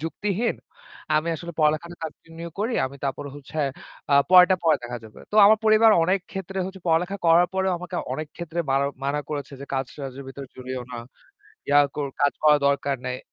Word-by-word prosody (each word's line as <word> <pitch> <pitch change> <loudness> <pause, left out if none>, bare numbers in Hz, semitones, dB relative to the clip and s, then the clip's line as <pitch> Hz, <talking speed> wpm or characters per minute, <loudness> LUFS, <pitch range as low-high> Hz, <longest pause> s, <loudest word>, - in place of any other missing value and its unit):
যুক্তিহীন। 205 +7 -2 0.6
আমি 160 +2 0
আসলে 170 +2 -8
পড়ালেখাটা 155 +3 +1
কন্টিনিউ 165 +2 -8
করি। 230 +3 -1
আমি 140 +2 -10
তারপরে 140 +1 -3
হচ্ছে 145 +2 -9 0.5
আ - - +7 0.2
পরেরটা 185 0 +8
পরে 160 -2 +5
দেখা 120 0 -5
যাবে। 110 - -14
তো - - 0
আমার 215 +1 +6
পরিবার 220 +1 +6
অনেক 185 +3 +2
ক্ষেত্রে 195 0 -5
হচ্ছে 190 0 -9
পড়ালেখা 175 +5 +1
করার 170 +2 +5
পরেও 190 0 +1
আমাকে 180 0 -6 0.2
অনেক 155 -1 -5
ক্ষেত্রে 170 0 -4
মারা 140 +1 +2 0.2
মানা 145 +2 0
করেছে 145 -2 -4
যে, - - -6
"কাজ-টাজের 135 0 -5
ভেতরে 135 +1 -8
জড়িও 130 0 -5
না। 120 - -5 0.7
ইয়া 145 0 +6 0.2
কর 145 -1 -1 0.2
কাজ 145 - +4
করার 150 -1 +5
দরকার 140 0 0
নেই। 125 0 -3
155 Hz, 180 wpm, -24 LUFS, 140-180 Hz, 0.7 s, পরেরটা